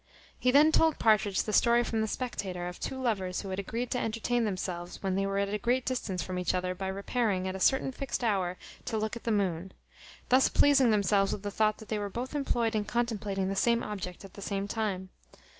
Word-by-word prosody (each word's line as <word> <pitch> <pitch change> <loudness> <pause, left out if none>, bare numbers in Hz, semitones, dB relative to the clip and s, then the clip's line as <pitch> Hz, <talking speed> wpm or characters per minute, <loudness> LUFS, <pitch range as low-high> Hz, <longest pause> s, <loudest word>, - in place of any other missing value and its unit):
He 250 - +2
then 295 +4 +6
told 320 -1 +3
Partridge 210 -3 +3
the 215 - -4
story 235 +2 +4
from 225 -2 -1
the 220 - 0
Spectator, 190 -7 -4
of 180 - -7
two 265 - -4
lovers 195 -8 -1
who 195 - -7
had 190 +1 -3
agreed 230 +5 -3
to 250 - 0
entertain 230 +1 0
themselves 180 -3 -4
when 190 -1 0
they 195 +1 0
were 195 0 -1
at 200 0 0
a 210 - -1
great 245 +4 +1
distance 210 -8 -2
from 185 -1 -4
each 180 - 0
other, 180 0 -1
by 190 +1 -5
repairing, 200 0 -1
at 185 - -3
a - - -5
certain 265 +6 +2
fixed 265 -1 -4
hour, 190 -5 0 0.3
to 225 - -2
look 215 +1 -2
at 235 - -9
the 230 - +1
moon; 190 -3 0 0.6
thus 255 +1 +5
pleasing 270 -4 +5
themselves 200 -2 +3
with 200 - -6
the 205 - -3
thought 215 +1 +2
that 220 - -13
they 215 - -1
were 205 -1 -3
both 245 +7 -5
employed 240 -5 0
in 215 -1 +1
contemplating 205 -4 -1
the 195 - -2
same 235 +4 +2
object 195 -3 -6
at 195 - -13
the 200 - -10
same 200 0 -2
time. 200 -4 -2
210 Hz, 230 wpm, -30 LUFS, 190-235 Hz, 0.6 s, then